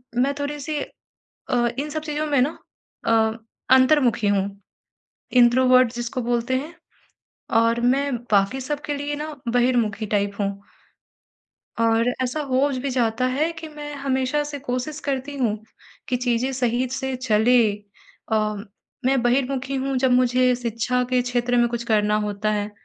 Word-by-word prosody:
मैं 260 +3 +2
थोड़ी-सी 295 +1 -3 0.7
अ, 240 -1 +2
इन 295 +2 -3
सब 310 +1 -3
चीज़ों 305 0 -2
में 285 -3 +2
ना 285 +5 0 0.5
अ, 220 -1 +3 0.4
अंतर्मुखी 260 -5 +3
हूँ, 200 0 -1 0.7
इंट्रोवर्ट 255 0 +5
जिसको 240 +1 -3
बोलते 240 +2 0
हैं 305 +6 -6 0.9
और 230 +1 +2
मैं 270 +3 +1 0.2
बाकी 200 +6 +3
सबके 295 +2 -3
लिए 290 +1 -3
ना 300 0 -6
बहिर्मुखी 235 -3 +1
टाइप 200 -1 0
हूँ। 200 -1 +1 1.3
और 230 +1 +3
ऐसा 255 +5 -2
हो 265 +3 +3 0.2
भी 280 - -1
जाता 245 -1 0
है 310 +4 +1
कि 325 -1 -8
मैं 295 -1 -8
हमेशा 275 +1 0
से 290 -1 -6
कोशिश 260 +3 -4
करती 275 +1 -2
हूँ 225 -5 0 0.5
कि 250 - +1
चीज़ें 245 +1 0
सही 250 0 0
से 265 0 -2
चले 245 0 +3 0.7
अम 215 -1 0 0.4
मैं 265 -1 +3
बहिर्मुखी 260 +2 0
हूँ 270 0 -1
जब 255 0 +2
मुझे 250 0 +3
शिक्षा 240 +1 -1
के 250 -1 +2
क्षेत्र 245 0 0
में 240 0 +4
कुछ 235 0 -3
करना 210 -1 +3
होता 210 0 -2
है, 210 0 -2
250 Hz, 145 wpm, -23 LUFS, 230-275 Hz, 1.3 s, इंट्रोवर्ट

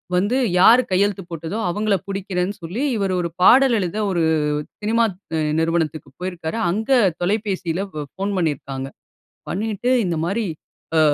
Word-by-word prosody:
வந்து 205 +8 +2 0.2
யாரு 235 +7 +7
கையெழுத்து 195 +1 +1
போட்டதோ, 165 +6 -4
அவங்கள 210 +3 +1
புடிக்கிறேன்னு 195 0 -2
சொல்லி 190 - -3
இவரு 195 -2 0
ஒரு 170 - -2
பாடல் 260 +3 +6
எழுத, 185 +1 -2
ஒரு 170 -2 +1 0.6
சினிமா 225 +2 +2 0.6
நிறுவனத்துக்கு 160 -4 -1
போயிருக்காரு. 175 0 -4
அங்க 220 +7 -2 0.3
தொலைபேசில 190 -2 -1
ப 150 -1 -4
ஃபோன் 200 +1 -2
பண்ணிருக்காங்க. 135 -4 -2 0.6
பண்ணிட்டு, 215 +4 -1
இந்த 175 - -1
மாரி 210 +6 -1 0.5
அ - - +6
190 Hz, 130 wpm, -21 LUFS, 170-210 Hz, 0.6 s, யாரு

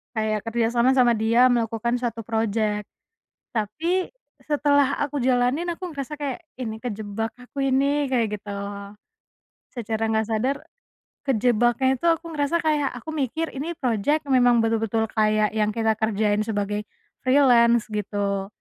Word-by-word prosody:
Kayak 215 -1 0
kerjasama 235 +2 +2
sama 250 -3 +4
dia 230 +3 +4
melakukan 235 -1 0
suatu 235 -3 -3
projek. 220 -2 0 0.7
Tapi 320 - -1 0.4
setelah 285 -2 +2
aku 290 0 -1
jalanin 255 +5 +1
aku 360 +1 -7
ngerasa 285 -1 -6
kayak, 290 +2 -5
"Ini 225 -4 -5
kejebak 220 -1 -4
aku 250 +3 -16
ini." 280 +2 +2
Kayak 230 -5 0
gitu. 205 0 -8 1.2
Secara 225 -2 -4
nggak 220 -1 +1
sadar. 235 +5 0 0.7
Kejebaknya 245 +2 +2
itu - - -5
aku 330 0 +1
ngerasa 305 +3 0
kayak 295 -4 +1
aku 315 - -9
mikir 315 +2 -2
ini 305 +6 -4
projek 260 +5 0
memang 245 -2 +4
betul-betul 225 0 0
kayak 215 -1 +2
yang 210 0 +1
kita 220 -1 +1
kerjain 215 -1 +1
sebagai, 205 -1 -2 0.4
freelance 240 -4 +4
gitu, 200 -2 -2
235 Hz, 130 wpm, -24 LUFS, 220-275 Hz, 1.2 s, sama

